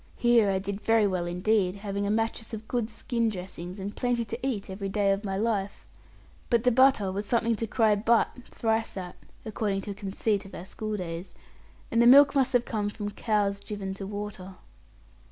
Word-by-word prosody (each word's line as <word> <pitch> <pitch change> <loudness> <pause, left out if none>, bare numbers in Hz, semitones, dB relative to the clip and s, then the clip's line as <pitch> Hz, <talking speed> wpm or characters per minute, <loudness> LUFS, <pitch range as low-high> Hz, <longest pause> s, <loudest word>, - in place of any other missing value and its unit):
Here 240 -4 +4
I 190 - +1
did 200 +2 -4
very 225 -1 +3
well 185 -3 -1
indeed, 185 +1 +1
having 200 0 -3
a - - -1
mattress 225 +1 -1
of 220 0 -10
good 240 -3 -1
skin 230 0 -1
dressings, 180 -1 -7
and 200 +2 -5
plenty 245 -2 0
to 230 +2 -5
eat 220 -7 -2
every 195 +1 -5
day 200 0 +2
of 195 +2 -1
my 195 -2 -2
life, 205 -2 -2 0.6
but 235 -2 +2
the 250 - +4
butter 255 -6 +4
was 200 +2 -4
something 235 -1 +2
to 225 - -3
cry 220 -1 +3
'but' 225 +4 +2
thrice 225 -2 -1
at 180 -2 -6 0.3
(according 210 -2 -1
to 205 - -6
a - - -3
conceit 200 +1 -1
of 195 - -11
our 175 - -7
school 215 +2 -4
days), 175 0 -6 0.6
and 230 - +3
the 235 - +6
milk 280 +3 +8
must 265 -2 +2
have 245 -1 +3
come 210 -3 -2
from 205 0 -5
cows 205 -2 0
driven 200 -2 -5
to 195 0 -7
water. 205 -2 -6
210 Hz, 200 wpm, -27 LUFS, 195-225 Hz, 0.6 s, milk